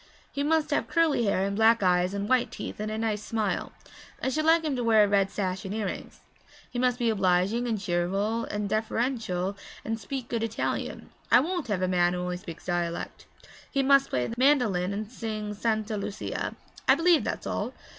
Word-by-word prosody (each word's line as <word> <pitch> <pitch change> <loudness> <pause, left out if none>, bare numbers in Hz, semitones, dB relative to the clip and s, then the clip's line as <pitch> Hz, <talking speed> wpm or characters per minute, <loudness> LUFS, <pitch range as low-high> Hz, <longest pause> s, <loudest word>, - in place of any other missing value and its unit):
'He 280 - -3
must 310 +1 +1
have 290 - +1
curly 320 -8 +2
hair 195 -1 +1
and 200 0 -2
black 225 0 +4
eyes 180 +1 +2
and 200 0 -2
white 255 0 +2
teeth - - -7
and 215 0 -2
a 215 - -3
nice 220 -2 -1
smile; 215 -3 -2 0.5
I - - -1
should 310 +3 -1
like 325 +1 +5
him 300 -4 -1
to 245 - -2
wear 220 -2 +5
a - - +3
red 200 -1 +2
sash 190 -2 -2
and 195 +2 -4
earrings. 210 -4 -5 0.5
He 245 - -3
must 250 -1 +2
be 235 -2 +2
obliging 195 +4 +2
and 220 -3 -1
cheerful 195 +5 0
and 205 0 -3
deferential 215 -3 -1 0.3
and 225 +1 -2
speak 250 +4 -5
good 230 -2 -2
Italian 225 0 -3 0.2
I - - +8
won't 345 +2 -2
have 195 -4 -1
a - - +2
man 175 -1 +2
who 180 0 -2
speaks 180 -2 -9
only 175 -1 +1
dialect. 170 0 -6 0.4
He 275 -1 +1
must 275 0 +5
play 125 -1 0
the - - -4
mandolin 230 -10 +3
and 205 +1 -3
sing 215 -3 -4
Santa 215 0 -1
Lucia 200 0 -4 0.3
I - - +7
believe 335 -1 +4
that's - - -3
all.' - - -2
215 Hz, 200 wpm, -27 LUFS, 195-245 Hz, 0.5 s, I